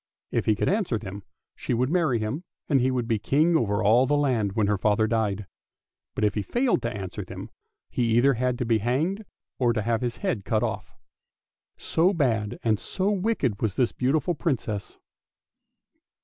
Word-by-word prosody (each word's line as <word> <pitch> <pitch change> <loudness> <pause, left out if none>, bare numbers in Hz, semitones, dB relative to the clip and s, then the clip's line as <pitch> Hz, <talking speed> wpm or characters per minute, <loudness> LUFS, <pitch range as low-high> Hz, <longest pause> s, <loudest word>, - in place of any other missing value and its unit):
If - - 0
he 110 - +4
could - - -1
answer 190 - +1
them, 100 -1 -7 0.3
she 125 - -2
would 125 +4 0
marry 165 -9 +2
him, 110 +10 -3 0.2
and 135 -4 +3
he 130 - +2
would 125 -3 -1
be 115 -3 +1
king 155 +10 +2
over 105 -6 +1
all 120 +6 +5
the 145 - +2
land 120 -9 +1
when 110 -1 +1
her 105 -1 +1
father 105 +1 +2
died; 105 -3 0 0.7
but - - -2
if 105 -2 +3
he 105 - -1
failed 240 - +1
to 115 - -2
answer 95 -3 -5
them, - - -9 0.4
he 115 -2 +1
either 135 +3 +5
had 125 0 0
to 125 - -2
be 115 -1 +2
hanged 155 - 0 0.4
or 120 -2 +3
to 110 -2 -1
have 115 +1 0
his 120 -1 -2
head 155 - -2
cut 110 +2 0
off. 105 -2 -4 0.8
So 180 +5 +2
bad 110 -9 0
and 110 -3 +2
so 195 +1 -1
wicked 190 - 0
was 105 -4 0
this 125 - +2
beautiful 145 +6 0
Princess. 115 -10 -3
120 Hz, 190 wpm, -26 LUFS, 110-145 Hz, 0.8 s, all